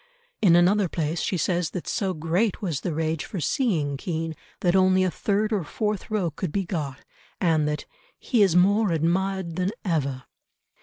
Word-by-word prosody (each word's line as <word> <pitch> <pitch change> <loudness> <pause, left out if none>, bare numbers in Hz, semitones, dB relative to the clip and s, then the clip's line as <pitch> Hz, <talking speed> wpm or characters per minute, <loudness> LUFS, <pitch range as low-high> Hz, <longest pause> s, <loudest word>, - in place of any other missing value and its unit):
In 175 -5 +6
another 185 +2 +4
place 160 0 -2
she 185 - -1
says 175 +1 0
that 180 - -6
so 190 -3 -1
great 170 +7 0
was 170 -9 -2
the 175 - -2
rage 160 -1 -1
for 195 - -6
seeing 155 - 0
Kean 165 +1 -3 0.3
that 175 0 +2
only 185 0 +4
a 185 - +1
third 210 +4 0
or 200 -5 0
fourth 210 +8 -3
row 200 -6 0
could 155 +2 -4
be 195 +1 -1
got, 150 -8 -3 0.4
and 160 -4 +2
that 150 0 -2 0.3
"he 240 -5 +1
is 190 -4 +4
more 200 +4 +4
admired 175 +2 0
than 185 +1 +1 0.2
ever." 140 -7 -1
175 Hz, 175 wpm, -25 LUFS, 160-195 Hz, 0.4 s, In